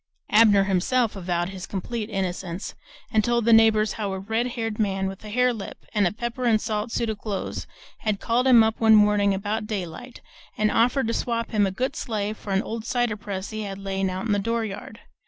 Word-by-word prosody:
Abner 210 -2 +6
himself 205 +5 +1
avowed 175 -2 -2
his 190 -1 -7
complete 215 +3 -4
innocence, 185 -2 -3 0.4
and 215 -1 +3
told 235 0 +1
the 230 - +5
neighbors 220 -1 +5
how 205 -3 -3
a 190 - -4
red 225 +5 -1
haired 225 -3 -4
man 195 -2 0
with 190 +1 -5
a 210 - -8
hare 250 +3 +2
lip 215 -4 -8
and 205 -4 +3
a - - -1
pepper 235 +3 -4
and 225 -2 +4
salt 215 +1 -3
suit 235 - -1
of 210 - -7
clothes 205 -3 -4 0.3
had 215 -2 -1
called 245 +3 +1
him 240 -3 +8
up 220 0 0
one 220 -1 +6
morning 210 -1 +4
about 210 +2 -3
daylight 210 +4 -6 0.4
and 215 0 +2
offered 250 +3 +2
to 230 - -1
swap 230 -1 -2
him 205 -2 +3
a - - -2
good 255 +7 -2
sleigh 215 -4 -2
for 210 -2 -8
an 195 +1 +2
old 225 0 -5
cider 240 -2 0
press 200 -1 -6
he 215 0 -4
had 195 -2 -5
layin' 195 -1 -2
out 185 +2 -4
in 225 - -1
the 205 - +2
dooryard. 220 0 -3
215 Hz, 215 wpm, -25 LUFS, 195-230 Hz, 0.4 s, him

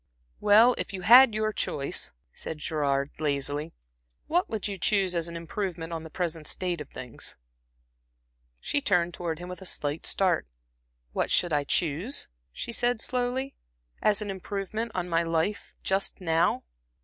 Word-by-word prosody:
"Well, 220 +4 +7
if - - -4
you 185 -1 -5
had 245 +2 +9
your 215 0 0
choice," 140 -7 -2 0.2
said 160 - -6
Gerard, 145 -3 0
lazily, 145 +1 -1 0.5
"what 350 +3 +1
would 220 -2 -2
you 200 -2 -5
choose 195 -1 +2
as 170 -1 0
an 170 - -7
improvement 170 -1 -4
on 165 - -3
the 160 - -9
present 165 -2 -3
state 180 -4 -2
of 145 - -8
things?" 125 -2 -7 1.2
She 285 - 0
turned 175 -8 +2
towards 170 -3 -3
him 180 - -7
with 180 +1 -7
a 190 - -5
slight 145 -1 -2
start. 185 - +2 0.7
"What - - 0
should 175 -3 +3
I 145 -1 +2
choose," 170 - 0 0.2
she 65 - -5
said, 240 0 +1
slowly 255 +3 -1 0.5
"as 210 0 +3
an 205 - -3
improvement 200 +4 -3
on 180 -1 -1
my 165 -1 +2
life 165 +5 -1
just 195 +1 0
now?" 165 -6 +2
180 Hz, 160 wpm, -28 LUFS, 160-210 Hz, 1.2 s, had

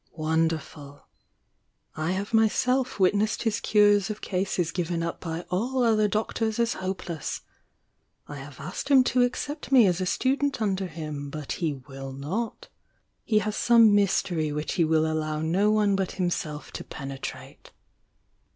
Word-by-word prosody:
"Wonder 160 0 +1
ful! 145 -1 -13 0.9
I 160 +3 -1
have 200 +4 -4
myself 250 +3 +2
witnessed 205 +3 +2
his 225 -2 0
cures 205 -1 +4
of 215 - -4
cases 180 -3 -1
given 170 -1 -2
up 170 - -4
by 165 0 -5
all 245 +8 0
other 215 -2 +3
doctors 220 +1 -1
as 235 0 +1
hopeless. 180 -4 -4 0.9
I 145 - -7
have 140 0 -10
asked 185 - -6
him 270 -2 +7
to 250 0 +2
accept 270 +5 -2
me 255 -5 +7
as 180 -1 +1
a 185 - -1
student 275 +5 0
under 195 -3 0
him, 150 -3 -6
but 150 -1 -6
he 160 -4 -1
will 135 0 -9
not. 180 - -4 0.6
He 215 - +1
has 215 0 -2
some 230 -3 +5
my.etery 180 -6 +1
which 150 +1 -3
he 175 - +2
will 160 0 +2
allow 155 -1 -1
no 175 +7 +2
one 210 -2 +3
but 195 -1 -1
himself 170 -5 -3
to - - -6
penetrate." 135 -2 -8
185 Hz, 155 wpm, -26 LUFS, 155-215 Hz, 0.9 s, him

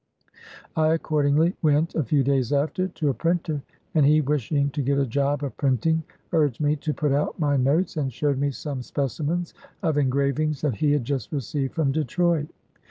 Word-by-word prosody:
I 155 0 +3
accordingly 155 +1 +2
went, 155 +1 +2
a 160 - 0
few 140 +3 +2
days 135 -2 +1
after, 155 +6 +1
to 165 -5 -2
a - - +1
printer, 165 -1 -1 0.3
and 155 - +4
he, 150 +2 +5
wishing 140 0 0
to 145 - -2
get 140 +1 +1
a 140 - +2
job 140 +3 0
of 140 - -4
printing, 145 +4 +1 0.3
urged 150 -7 +2
me 150 0 +2
to 150 +2 -2
put 150 -1 -1
out 145 +2 0
my 145 -3 +1
notes, 145 +7 +1
and 135 -3 -1
showed 140 +2 0
me 145 0 +1
some 140 -1 -5
specimens 150 +7 -2 0.3
of 155 -3 +2
engravings 140 +2 0
that 150 -4 +1
he 150 -2 +2
had 145 -4 +1
just 135 0 -3
received 140 -1 -3
from 150 -4 +1
Detroit. 155 +2 0
145 Hz, 185 wpm, -24 LUFS, 140-155 Hz, 0.3 s, he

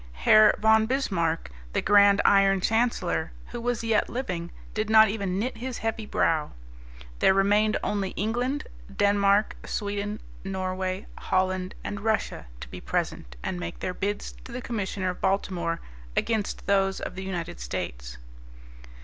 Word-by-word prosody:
Herr 215 - +6
von 220 0 +4
Bismarck, 170 - -1 0.2
the - - +1
grand 200 -1 +6
Iron 195 -1 +5
Chancellor, 215 -6 0 0.2
who 240 - -6
was 240 -1 -1
yet 225 -2 +2
living, 180 -9 -3 0.2
did 215 0 -2
not 220 -1 +7
even 200 -3 -2
knit 230 +4 -2
his 250 +1 -4
heavy 225 -1 -3
brow. 155 -6 +1 0.7
There 190 - +5
remained 205 +2 +3
only 200 -2 -1
England, 245 +7 -1 0.3
Denmark, 200 +1 +3
Sweden, 205 +1 -3 0.2
Norway, 185 0 -3
Holland 185 0 0
and 205 - -4
Russia 220 - -1
to 65 - -7
be - - -9
present - - -3
and 90 - -3
make 85 -1 -5
their 180 - -3
bids 205 +2 -3
to - - -11
the 250 - -4
Commissioner 200 -6 -2
of 180 - -11
Baltimore, 185 -3 0 0.4
against 220 -3 -1
those 195 -1 +2
of - - -5
the 190 +1 -6
United 175 - -4
States. - - -5
200 Hz, 145 wpm, -26 LUFS, 185-220 Hz, 0.7 s, not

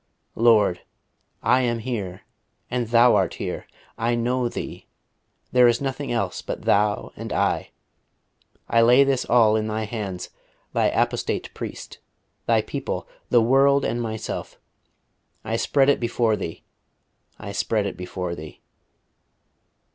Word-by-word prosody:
"Lord, 110 -6 +4 0.6
I 125 +3 +4
am 120 -2 0
here, 105 -7 -4 0.5
and 125 -2 -1
Thou 120 0 +5
art 95 -3 +1
here. - - -5 0.3
I 120 +1 +1
know 120 +1 0
Thee. - - -7 0.6
There 125 -1 +6
is 120 0 +3
nothing 140 +1 -3
else 100 -6 -1
but - - -6
Thou 105 0 +1
and - - -7
I.... - - 0 1.0
I 115 - +3
lay 125 +4 +6
this 135 -2 0
all 115 -3 +4
in 110 0 0
Thy 110 0 -2
hands 100 -5 -5 0.4
Thy - - +3
apostate - - -1
priest, - - -8 0.5
Thy - - +3
people, - - -4 0.2
the 120 -2 +5
world, 135 +3 +4
and 120 - -1
myself. 110 -1 -5 0.8
I 115 - -2
spread 135 +4 +2
it 145 - +4
before 115 -2 +1
Thee 80 - -6 0.7
I 100 -2 -7
spread 105 +1 0
it 100 - -3
before 90 -1 -5
Thee." 80 -2 -9
115 Hz, 135 wpm, -24 LUFS, 105-125 Hz, 1.0 s, There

